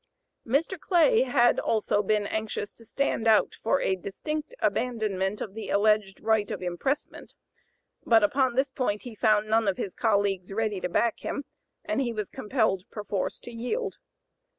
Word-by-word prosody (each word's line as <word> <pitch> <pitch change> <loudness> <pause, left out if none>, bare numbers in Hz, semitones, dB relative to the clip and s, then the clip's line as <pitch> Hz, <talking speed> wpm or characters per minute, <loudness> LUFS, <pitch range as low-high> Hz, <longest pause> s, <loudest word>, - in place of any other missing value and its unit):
Mr. 315 +9 0
Clay 400 +8 +4
had 245 - +3
also 210 -2 +1
been 210 0 +1
anxious 215 -1 -3
to 230 - -14
stand 230 -1 -1
out 220 -1 +4
for 275 +5 +2
a 190 - +1
distinct 305 - -5
abandonment 210 -5 -1
of 195 - -5
the 220 +1 -6
alleged 205 -2 +2
right 220 -2 +2
of - - -5
impressment; 180 +11 -3 0.7
but 225 -2 +5
upon 255 +3 +2
this 265 +1 +1
point 230 -6 -1
he 245 - -8
found 215 -1 +2
none 220 0 +2
of 195 - +1
his 190 - -4
colleagues 200 -4 0
ready 210 -2 -1
to - - -2
back 230 +5 +1
him, 280 - -4 0.4
and - - 0
he 245 -3 -1
was 210 -3 -4
compelled 215 -5 0
perforce 205 -3 -3
to 240 - -10
yield. 315 - -3
220 Hz, 165 wpm, -27 LUFS, 205-250 Hz, 0.7 s, but